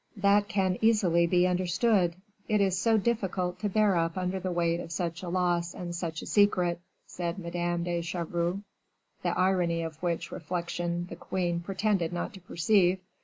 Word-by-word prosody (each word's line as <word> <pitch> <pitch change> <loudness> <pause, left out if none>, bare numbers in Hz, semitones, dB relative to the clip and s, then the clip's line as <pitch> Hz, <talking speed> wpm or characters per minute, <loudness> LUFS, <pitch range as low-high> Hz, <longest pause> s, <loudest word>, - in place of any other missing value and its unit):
"That 200 +1 +3
can 190 -4 0
easily 190 -7 +4
be 180 +1 +3
understood; 180 +1 +2 0.3
it 215 -2 +2
is 195 -2 +2
so 220 +4 +3
difficult 190 -5 -1
to 210 - -1
bear 210 -1 +3
up 165 +1 0
under 185 +1 -1
the 185 0 -3
weight 170 -1 +1
of 165 - -7
such 170 0 -3
a 180 - -5
loss 175 -1 0
and 175 -1 -5
such 170 -2 -4
a - - -7
secret," 180 -4 +2 0.2
said 170 0 -4
Madame 175 -1 -2
de 175 -1 -1
Chevreuse, 170 +2 -2 0.6
the - - -1
irony 180 -3 +2
of 160 -1 -7
which 170 -2 -2
reflection 175 +1 -3
the 170 - -8
queen 175 -1 -2
pretended 190 -1 0
not 175 - -3
to 190 - -10
perceive. 180 +1 +2
180 Hz, 170 wpm, -29 LUFS, 170-190 Hz, 0.6 s, easily